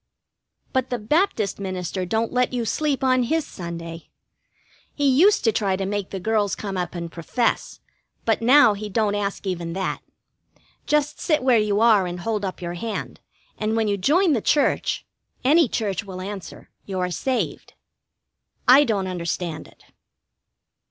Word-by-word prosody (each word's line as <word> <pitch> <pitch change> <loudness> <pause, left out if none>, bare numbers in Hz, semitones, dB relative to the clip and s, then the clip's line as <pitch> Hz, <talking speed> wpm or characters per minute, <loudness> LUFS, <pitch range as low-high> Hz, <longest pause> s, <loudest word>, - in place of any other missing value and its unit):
But 260 -1 0
the 245 - -1
Baptist 230 - 0
minister 185 -1 -3
don't 225 +4 -1
let 250 0 +1
you 240 -2 -1
sleep 280 +4 -1
on 255 -1 +3
his 315 +6 0
Sunday. 170 -1 -8 0.9
He 290 -1 +1
used 335 +11 +5
to 225 - +4
try 200 -2 0
to 195 0 -3
make 200 0 -3
the 195 - -5
girls 210 0 0
come 200 -2 -5
up 180 0 -3
and 170 -1 -5
profess, 200 +9 -2 0.4
but 225 0 +1
now 245 -1 +6
he 210 +1 -6
don't 210 0 +1
ask 205 -1 -3
even 170 -3 -3
that. 190 +1 -3 0.9
Just 300 0 +1
sit 305 -5 +1
where 250 -3 +5
you 210 0 +1
are 215 -5 +5
and 175 0 -5
hold 215 0 -2
up 185 -1 -4
your 175 0 -3
hand, 215 +5 -5 0.4
and 215 +1 0
when 225 -1 +1
you 205 - +1
join 315 - +3
the 235 - +1
church 290 +6 +1 0.4
any 305 +4 +5
church 205 -3 -2
will 190 -2 -8
answer 195 -2 -8 0.2
you 190 -2 -3
are 180 0 -1
saved. 255 +8 -2 0.9
I 265 +4 +8
don't 205 -6 0
understand 170 -2 -4
it. - - -21
210 Hz, 165 wpm, -23 LUFS, 185-250 Hz, 0.9 s, I